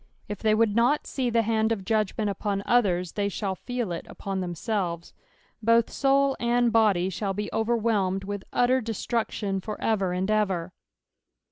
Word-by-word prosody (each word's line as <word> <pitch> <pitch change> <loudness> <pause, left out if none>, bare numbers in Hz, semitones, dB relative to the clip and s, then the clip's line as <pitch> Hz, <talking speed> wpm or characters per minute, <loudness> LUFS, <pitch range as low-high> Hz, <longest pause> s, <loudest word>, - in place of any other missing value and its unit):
If 205 -2 -5
they 215 -1 +3
would 215 -2 +2
not 245 +6 +3
see 255 -3 -2
the 230 -1 +2
hand 220 0 +1
of 200 -4 -2
judgment 215 0 0
upon 200 0 -2
others, 185 -7 +2
they 200 -1 -1
shall 195 -1 -2
feel 240 0 -4
it 170 - -5
upon 195 -1 -4
themseWes. 175 -1 -3 0.5
Both 230 +1 +3
soul 275 0 +2
and 240 -1 +2
body 200 -5 +3
shall 195 +1 -2
be 210 +1 -4
overwhelmed 220 -4 +1
with 200 0 -5
utter 255 +1 +3
destruction 220 -3 -2
for 215 +2 -6
ever 195 -5 0
and 185 +3 -1
ever. 190 -5 0
215 Hz, 160 wpm, -26 LUFS, 190-230 Hz, 0.5 s, they